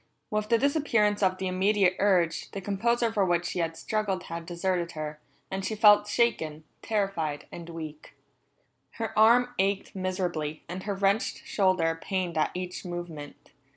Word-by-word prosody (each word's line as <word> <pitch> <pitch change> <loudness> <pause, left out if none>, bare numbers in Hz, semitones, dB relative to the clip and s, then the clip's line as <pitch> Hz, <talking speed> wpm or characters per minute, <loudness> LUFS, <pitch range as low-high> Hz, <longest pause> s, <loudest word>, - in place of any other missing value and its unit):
With 215 0 -1
the 230 - +5
disappearance 230 -7 +2
of 185 -1 +2
the 190 - -4
immediate 190 0 +2
urge, 180 -5 +2
the 195 - -3
composure 230 +4 0
for 205 -3 +2
which 175 -1 +1
she 180 - -3
had 165 -1 -1
struggled 205 -4 -1
had 170 0 -7
deserted 175 -1 -1
her, 150 -1 -5 0.3
and 190 0 -3
she 220 - -2
felt 210 -1 +6
shaken, 160 -9 0 0.2
terrified, 195 -9 -1
and 170 0 -8
weak. 155 -2 -8 0.8
Her 225 -1 -4
arm 240 +3 +5
ached 195 +1 0
miserably, 180 -5 -2
and 180 +2 -5
her 200 -1 -1
wrenched 200 +2 0
shoulder 180 -5 +1
pained 185 -4 -2
at 155 - +2
each 180 0 -5
movement. 175 -5 -7
190 Hz, 155 wpm, -28 LUFS, 170-210 Hz, 0.8 s, felt